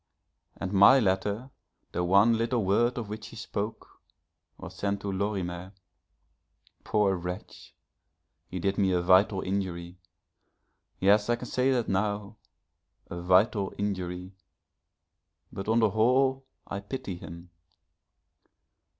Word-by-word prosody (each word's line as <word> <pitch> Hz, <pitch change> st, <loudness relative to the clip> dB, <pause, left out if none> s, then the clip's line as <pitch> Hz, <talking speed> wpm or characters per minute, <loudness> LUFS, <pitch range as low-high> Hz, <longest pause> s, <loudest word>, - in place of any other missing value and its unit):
And 95 Hz, +1 st, -4 dB
my 100 Hz, +7 st, +7 dB
letter, 105 Hz, +4 st, -1 dB, 0.4 s
the 90 Hz, -, -1 dB
one 100 Hz, +6 st, +5 dB
little 115 Hz, -1 st, 0 dB
word 120 Hz, +6 st, +2 dB
of 115 Hz, -3 st, -4 dB
which 110 Hz, +1 st, -7 dB
she -, -, -11 dB
spoke, 110 Hz, -1 st, -6 dB, 0.6 s
was -, -, -10 dB
sent 100 Hz, 0 st, -2 dB
to 100 Hz, -, -3 dB
Lorimer. 95 Hz, -2 st, -3 dB, 1.1 s
Poor 105 Hz, -2 st, +2 dB
wretch! 90 Hz, +3 st, -8 dB, 0.7 s
he 95 Hz, -, -6 dB
did 95 Hz, +3 st, -1 dB
me 95 Hz, -2 st, +2 dB
a 90 Hz, -, +2 dB
vital 95 Hz, +2 st, +4 dB
injury 90 Hz, -2 st, -4 dB, 1.0 s
yes, 105 Hz, +3 st, +4 dB
I 120 Hz, -, +4 dB
can 120 Hz, -, -8 dB
say 130 Hz, +2 st, +1 dB
that 120 Hz, -3 st, 0 dB
now 100 Hz, +2 st, -2 dB, 0.7 s
a 85 Hz, -, -5 dB
vital 95 Hz, +3 st, +2 dB
injury, 95 Hz, -2 st, -4 dB, 1.2 s
but 95 Hz, -, -6 dB
on 110 Hz, +1 st, +2 dB
the 110 Hz, -2 st, +3 dB
whole 130 Hz, +5 st, +2 dB, 0.2 s
I 100 Hz, -, -5 dB
pity 100 Hz, -3 st, -6 dB
him. 85 Hz, 0 st, -11 dB
100 Hz, 125 wpm, -28 LUFS, 95-110 Hz, 1.2 s, my